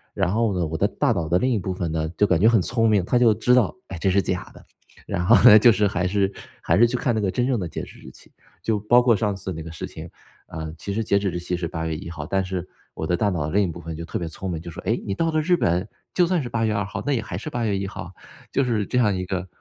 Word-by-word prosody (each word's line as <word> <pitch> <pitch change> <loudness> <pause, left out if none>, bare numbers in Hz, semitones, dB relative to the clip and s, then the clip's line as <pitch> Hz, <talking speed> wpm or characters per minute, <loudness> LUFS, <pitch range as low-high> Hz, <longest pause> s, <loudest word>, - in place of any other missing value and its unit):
然 95 -1 0
后 110 -3 +1
呢， 85 - 0
我 80 +1 -4
的 - - +2
大 - - 0
脑 80 -2 -1
的 90 - +3
另 130 - +1
一 115 - +1
部 95 0 -3
分 90 -2 -3
呢， 80 -1 -1
就 105 - +4
感 90 -4 +2
觉 110 - +6
很 115 -4 +4
聪 115 +3 +1
明， 100 -4 +2
它 125 - +2
就 120 -3 +5
知 115 +4 +2
道， 120 -6 +3
哎， 95 - -7
这 95 - +1
是 100 +2 +3
假 85 - -3
的。 - - -16 0.4
然 90 - -2
后 115 +5 +7
呢， 105 - +10
就 120 +2 +7
是 105 -1 +2
还 90 -2 -1
是 100 +1 0 0.3
还 85 - +2
是 120 +3 +6
去 125 - -2
看 125 - 0
那 110 - 0
个 100 - 0
真 125 - 0
正 130 -2 +1
的 90 - -3
截 - - -5
止 - - -12
日 - - -12
期。 - - -18 0.3
就 110 -2 0
包 120 +4 +4
括 120 -2 +4
上 105 0 0
次 95 -1 -6
那 80 - -6
个 80 - -8
事 80 - -6
情， - - -9 0.4
呃， 80 -1 -6
其 100 +5 -5
实 115 - -1
截 100 -1 +2
止 100 -1 -1
日 90 - -4
期 90 +1 -3
是 85 -1 -3
八 80 -2 -4
月 80 -1 -2
1 85 +2 -7
号， 80 -3 -6
但 95 +3 0
是， 90 -1 -4 0.3
我 80 - -4
的 90 - +2
大 105 +3 +1
脑 85 -6 -2
的 75 - -4
另 100 +1 +4
一 - - 0
部 85 0 -7
分 80 -1 -7
就 85 - -6
特 - - -4
别 85 - -4
聪 90 +4 -6
明， 85 - -3
就 85 - -8
说： - - -9
“哎， - - 0
你 100 - -2
到 165 +10 0
了 155 - +1
日 175 +3 +3
本， 90 - 0 0.3
就 175 -2 +3
算 180 -2 +1
是 120 - -5
八 115 -1 0
月 110 - 0
2 100 0 0
号， 100 - -5
那 145 - +1
也 120 - 0
还 90 -4 -6
是 105 - -6
八 120 -1 -3
月 100 -3 0
1 95 0 -3
号。” 85 -3 -8 0.4
就 140 - +2
是 110 -4 0
这 - - -1
样 105 -5 +3
一 90 - -2
个 95 0 -3
100 Hz, 340 characters per minute, -23 LUFS, 85-115 Hz, 0.4 s, 呢